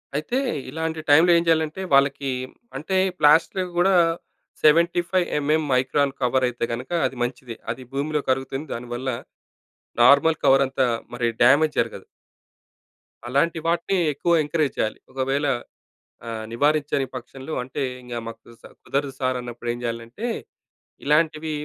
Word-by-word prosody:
అయితే 155 - -1 0.3
ఇలాంటి 160 +2 -3
టైమ్‌లో 160 +4 +6
ఏం 170 - +2
చేయాలంటే 160 +2 +1
వాళ్ళకి 140 0 +3 0.5
అంటే 185 +7 -2 0.2
ప్లాస్ట్‌లో 160 +5 +4 0.2
కూడా 190 +2 +4 0.7
75 175 +3 +3
ఎంఎం 155 +2 +1
మైక్రాన్ 130 +2 +1
కవర్ 130 +1 +2
అయితే 120 - -6
గనుక 125 +6 -6
అది 130 - -2
మంచిది. 120 -1 -5 0.2
అది 130 - -7
భూమిలో 150 +2 -1
కరుగుతుంది 135 +3 -1
దానివల్ల 120 +2 -5 0.9
నార్మల్ 140 +6 +6
కవర్ 135 +1 +5
అంతా 130 -1 0 0.3
మరి 120 -1 0
డ్యామేజ్ 145 +5 +4
జరగదు. 110 -4 -4 1.2
అలాంటి 160 +6 +1
వాటిని 170 +3 +1 0.2
ఎక్కువ 170 +5 -1
ఎంకరేజ్ 150 -1 -1
చేయాలి. 110 - -1
ఒకవేళ 135 +2 -1 0.8
ఆహ్, 110 -1 -5
నివారించని 145 +2 +1
పక్షంలో 135 +4 -8
అంటే 130 +3 -5 0.2
ఇంక 125 -1 -8
మాకు 115 0 -8 0.4
కుదరదు 140 0 -2
సార్ 130 -1 0
అన్నప్పుడు 120 -1 -6
ఏం 120 - -4
చేయాలంటే, 115 - -5 0.8
ఇలాంటివి 155 +1 +1
140 Hz, 125 wpm, -23 LUFS, 125-160 Hz, 1.2 s, టైమ్‌లో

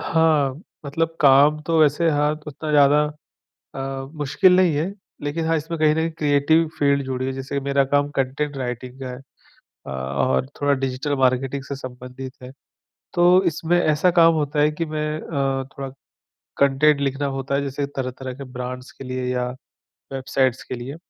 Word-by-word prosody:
हाँ, 155 -5 +2 0.3
मतलब 165 +3 -1
काम 145 +2 +6
तो 165 +1 +1
वैसे 155 +2 +3
हाँ, 150 0 +2
उतना 150 +1 -5
ज़्यादा 145 0 +5 0.7
अ, 135 0 -4
मुश्किल 180 +6 +4
नहीं 180 -4 +4
है 160 +7 -1 0.3
लेकिन 145 +3 -2
हाँ, 165 0 +2
इसमें 160 +2 -4
कहीं 155 -1 +4
न 160 +1 0
क्रिएटिव 150 +2 +3
फ़ील्ड 140 -1 +2
जुड़ी 130 -1 -3
है। 135 - -2
जैसे 135 +1 -4
मेरा 140 0 +2
काम 145 +1 +1
कॉन्टेंट 140 +2 -1
राइटिंग 125 0 -5
का 130 - -5
है 125 0 -7
अ, 135 0 -22 0.5
और 70 - 0 0.2
थोड़ा 145 0 +3
डिजिटल 135 +2 -2
मार्केटिंग 130 +1 +1
से 140 - -5
संबंधित 130 0 -8
है, 125 - -9 0.6
तो 180 +1 +5
इसमें 170 +1 +1
ऐसा 155 +2 +3
काम 165 -1 +5
होता 150 -1 0
है 150 +1 +4
कि 165 +2 -3
मैं 155 0 -3
अ, 135 -4 -1
थोड़ा 135 -1 -4 0.7
कॉन्टेंट 140 +2 +4
लिखना 140 +1 -1
होता 135 +1 -2
है, 140 - +1
जैसे 140 0 -2
तरह-तरह 130 -1 -5
के 140 +2 -8
ब्रांड्स 125 0 -6
के - - -11
लिए 130 0 -4
या 125 0 -1 0.7
वेबसाइट्स 130 -1 0
के - - -5
लिए, 125 +4 -6
140 Hz, 170 wpm, -22 LUFS, 130-155 Hz, 0.7 s, काम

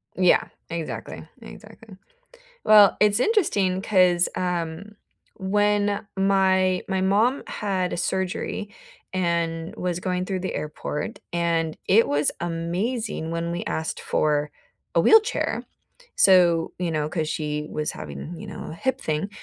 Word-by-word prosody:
Yeah. 185 -1 +4 0.3
Exactly, 165 -2 -6
exactly. 220 -5 -13 0.7
Well, 210 -2 +7
it's 210 +1 +4
interesting 200 - +1
'cause, 180 -4 +3
um, 180 +3 -3 0.4
when 205 +1 +1
my 190 -1 +2
my 190 -1 0
mom 215 +8 +2
had 190 -3 -2
a - - -2
surgery 190 +3 -2 0.4
and 170 -2 -1
was 180 -1 -2
going 180 0 -1
through 185 0 -3
the 185 - -4
airport, 150 0 -4 0.2
and 165 -2 0
it 220 +4 +4
was 145 +1 +1
amazing 175 +3 -2
when 170 0 -2
we 175 - -3
asked 160 0 -3
for 150 -1 0 0.4
a - - +5
wheelchair. 445 +1 +3 0.5
So, 175 -3 +4
you 180 -2 -1
know, 150 -2 -1
'cause 155 -2 -2
she 150 -2 -3
was 150 0 -2
having, 75 - -8
you - - -8
know, - - -8
a - - -7
hip 260 +10 -1
thing, 155 +5 -2
180 Hz, 135 wpm, -24 LUFS, 165-200 Hz, 0.7 s, Well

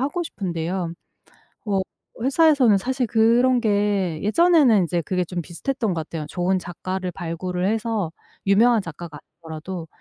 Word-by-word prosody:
하고 290 +7 -1
싶은데요. 175 - -3 0.7
워 195 -2 +1 0.4
회사에서는 270 -4 +4
사실 255 +5 -1
그런 240 +3 +3
게 200 -6 0
예전에는 265 - +4
이제 170 0 -1
그게 180 +3 -1
좀 175 0 -4
비슷했던 220 - -3
거 165 - -2
같아요. 155 -1 -6
"좋은 180 +2 0
작가를 185 +1 -5
발굴을 180 +2 -4
해서 220 -5 -1 0.3
유명한 220 +3 +4
작가가 165 -2 -8 0.2
아니더라도 165 +1 -7
190 Hz, 330 characters per minute, -23 LUFS, 175-235 Hz, 0.7 s, 회사에서는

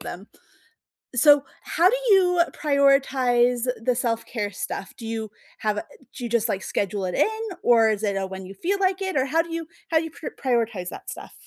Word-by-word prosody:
them. 190 +4 -8 0.9
So, 285 +3 +6 0.2
how 355 +3 +3
do - - +2 0.2
you 360 -3 +5
prioritize 260 -4 +3 0.2
the 250 +1 +2
self-care 230 -3 -2
stuff? 195 +4 -5
Do 230 -4 -8
you 220 -2 -4 0.3
have 215 -1 0
a - - -2 0.3
do 250 - -8
you 240 - -3
just, 230 -1 +1
like, 200 -3 -2
schedule 200 -1 -2
it 180 - -3
in? 440 +1 +1 0.2
Or 230 -2 +5
is 215 0 -1
it 200 -2 0
a 195 - -2
when 190 0 -7
you 195 - -9
feel 365 - -1
like 380 0 +1
it? 380 -6 -1
Or 260 - +2
how 315 +5 +2
do 335 0 -9
you 330 0 -3 0.2
how 325 - +3
do 320 - +2
you 325 - -7
pr 320 - -8
prioritize 230 -8 0
that - - -9
stuff? - - -9
245 Hz, 210 wpm, -24 LUFS, 215-310 Hz, 0.9 s, So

